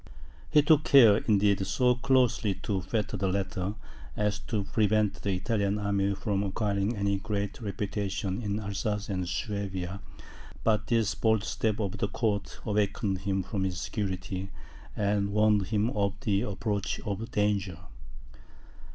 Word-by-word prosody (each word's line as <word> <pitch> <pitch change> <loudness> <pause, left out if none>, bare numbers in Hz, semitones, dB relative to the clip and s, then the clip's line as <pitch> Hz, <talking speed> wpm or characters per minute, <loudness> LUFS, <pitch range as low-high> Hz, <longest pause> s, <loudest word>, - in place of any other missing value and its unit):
He 150 -1 +5
took 155 0 +5
care, 115 -8 +7
indeed, 100 -3 +2
so 125 -1 +3
closely 125 -5 +2
to 100 -3 -1
fetter 105 +2 -2
the 95 0 0
latter, 95 +1 -2 0.4
as 105 0 0
to 105 -1 -2
prevent 105 0 +1
the 100 - 0
Italian 100 +2 0
army 100 -1 0
from 100 0 -1
acquiring 100 +2 -1
any 100 -1 0
great 100 +3 -3
reputation 100 -1 -3
in 105 -1 -2
Alsace 105 +1 -3
and 90 -3 -2
Swabia; 95 -1 -3 0.6
but 110 -1 +2
this 115 -4 +2
bold 110 0 +2
step 110 0 -1
of 100 -3 -2
the - - +1
court 105 -1 -2
awakened 100 -2 0
him 95 0 -1
from 95 +1 -2
his 90 -2 -2
security, 95 -1 -3 0.5
and 100 -1 +1
warned 105 -2 +3
him 110 +2 +1
of 100 -3 0
the 100 -6 +1
approach 105 -1 -2
of 105 +3 -4
danger. 105 -5 0
100 Hz, 145 wpm, -29 LUFS, 100-110 Hz, 0.6 s, care